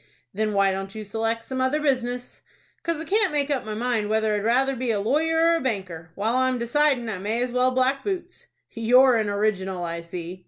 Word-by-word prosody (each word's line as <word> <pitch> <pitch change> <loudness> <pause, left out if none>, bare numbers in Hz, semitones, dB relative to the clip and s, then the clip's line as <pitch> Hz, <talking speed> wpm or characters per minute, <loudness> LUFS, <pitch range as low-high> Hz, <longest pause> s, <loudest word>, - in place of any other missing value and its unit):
"Then 215 +1 -1
why 200 -1 +3
don't 195 +1 -5
you 215 -1 -6
select 225 +2 -2
some 260 +2 -4
other 260 +4 +1
business?" 250 -4 -2 0.4
"'Cause 335 -2 -2
I 320 - -5
can't 405 +3 +2
make 295 -1 0
up 270 -5 -1
my 215 -1 -4
mind 225 -2 -1
whether 220 0 +1
I'd 205 -1 -1
rather 265 +4 +2
be 250 0 -3
a 215 -3 +1
lawyer 320 +9 +2
or - - +4
a - - -5
banker. 185 -9 -4
While 220 +5 0
I'm 260 0 +1
decidin' 250 +1 +1
I 210 -4 -4
may 215 +5 -1
as 250 - -3
well 250 +1 +2
black 260 +2 +1
boots." 365 -3 -5 0.2
"You're 245 +2 +5
an 215 -2 0
original, 195 -3 -1
I 170 0 -4
see." 170 +1 -7
235 Hz, 220 wpm, -24 LUFS, 205-265 Hz, 0.4 s, You're